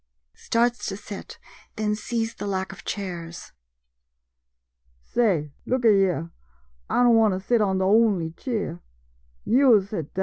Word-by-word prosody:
[Starts 240 Hz, +1 st, 0 dB
to 195 Hz, -, -4 dB
sit, 205 Hz, -1 st, -9 dB, 0.4 s
then 210 Hz, -1 st, -1 dB
sees 225 Hz, +1 st, -3 dB
the -, -, -6 dB
lack 190 Hz, -1 st, -2 dB
of 195 Hz, -, -12 dB
chairs.] 175 Hz, -4 st, -6 dB, 1.5 s
Say, 175 Hz, -, 0 dB, 0.2 s
look 255 Hz, -1 st, 0 dB
a 225 Hz, -, +7 dB
yere, 180 Hz, -4 st, +1 dB, 0.6 s
I 245 Hz, -, +3 dB
don' 240 Hz, -1 st, +5 dB
want 220 Hz, -4 st, +4 dB
to -, -, -3 dB
sit 225 Hz, +4 st, +1 dB
on 190 Hz, -2 st, +1 dB
de 190 Hz, -, 0 dB
only 200 Hz, -5 st, +3 dB
cheer 200 Hz, -3 st, -4 dB, 0.3 s
— -, -, -38 dB
yo' 245 Hz, -2 st, +5 dB
sit 190 Hz, -6 st, -6 dB
down. -, -, -3 dB
200 Hz, 155 wpm, -24 LUFS, 180-230 Hz, 1.5 s, a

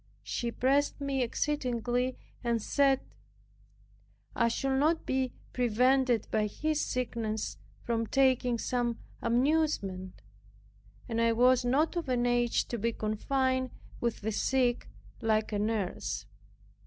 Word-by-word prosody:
She 240 Hz, -, -2 dB
pressed 275 Hz, +5 st, +1 dB
me 275 Hz, -2 st, -1 dB
exceedingly, 250 Hz, -1 st, -1 dB, 0.3 s
and 235 Hz, -1 st, +1 dB
said, 270 Hz, +4 st, +2 dB, 1.3 s
"I 235 Hz, -, +3 dB
should 265 Hz, +3 st, 0 dB
not 320 Hz, +3 st, +2 dB
be 260 Hz, -1 st, 0 dB, 0.2 s
prevented 250 Hz, 0 st, +2 dB
by 215 Hz, -1 st, +2 dB
his 305 Hz, +8 st, -1 dB
sickness 230 Hz, -3 st, -2 dB, 0.3 s
from 230 Hz, -1 st, -1 dB
taking 255 Hz, -2 st, +3 dB
some 240 Hz, 0 st, -1 dB, 0.2 s
amusement 235 Hz, -, 0 dB, 0.8 s
and 230 Hz, -1 st, -1 dB
I 230 Hz, 0 st, +4 dB
was 250 Hz, +2 st, +4 dB
not 280 Hz, +8 st, +2 dB
of 335 Hz, -5 st, -2 dB
an 245 Hz, -1 st, +1 dB
age 240 Hz, -1 st, +2 dB
to 235 Hz, -, -3 dB
be 230 Hz, +2 st, 0 dB
confined 260 Hz, +5 st, 0 dB, 0.3 s
with 235 Hz, -1 st, -1 dB
the 220 Hz, +1 st, -1 dB
sick 245 Hz, +2 st, +1 dB, 0.3 s
like 220 Hz, -1 st, +1 dB
a 205 Hz, -, 0 dB
nurse." 190 Hz, -, -2 dB
245 Hz, 120 wpm, -30 LUFS, 225-265 Hz, 1.3 s, I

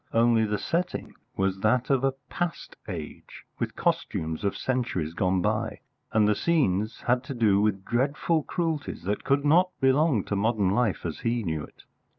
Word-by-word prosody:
Only 115 Hz, -1 st, +4 dB
the 105 Hz, 0 st, -1 dB
setting 175 Hz, -, -2 dB, 0.2 s
was 95 Hz, 0 st, 0 dB
that 120 Hz, +6 st, +2 dB
of 135 Hz, -1 st, +2 dB
a 135 Hz, 0 st, +2 dB
past 175 Hz, -1 st, -4 dB
age, 80 Hz, -7 st, -8 dB, 0.2 s
with -, -, -3 dB
costumes 80 Hz, +2 st, -1 dB
of 100 Hz, -, 0 dB
centuries 120 Hz, -11 st, -1 dB
gone 90 Hz, 0 st, +1 dB
by, 110 Hz, 0 st, -1 dB, 0.3 s
and 110 Hz, -1 st, +4 dB
the 105 Hz, -, +4 dB
scenes 110 Hz, -, +1 dB
had 125 Hz, +1 st, +1 dB
to 135 Hz, -, -5 dB
do 105 Hz, -4 st, +3 dB
with 100 Hz, -2 st, 0 dB
dreadful 140 Hz, +6 st, +1 dB
cruelties 160 Hz, -3 st, -3 dB
that 100 Hz, +3 st, -2 dB
could 140 Hz, +1 st, +1 dB
not 175 Hz, +5 st, +5 dB
belong 135 Hz, -, +3 dB
to 100 Hz, -, -3 dB
modern 105 Hz, -2 st, +1 dB
life 110 Hz, -3 st, 0 dB
as 80 Hz, -, -4 dB
he 115 Hz, 0 st, -1 dB
knew 80 Hz, -4 st, -2 dB
it. -, -, -14 dB
115 Hz, 170 wpm, -27 LUFS, 100-135 Hz, 0.3 s, not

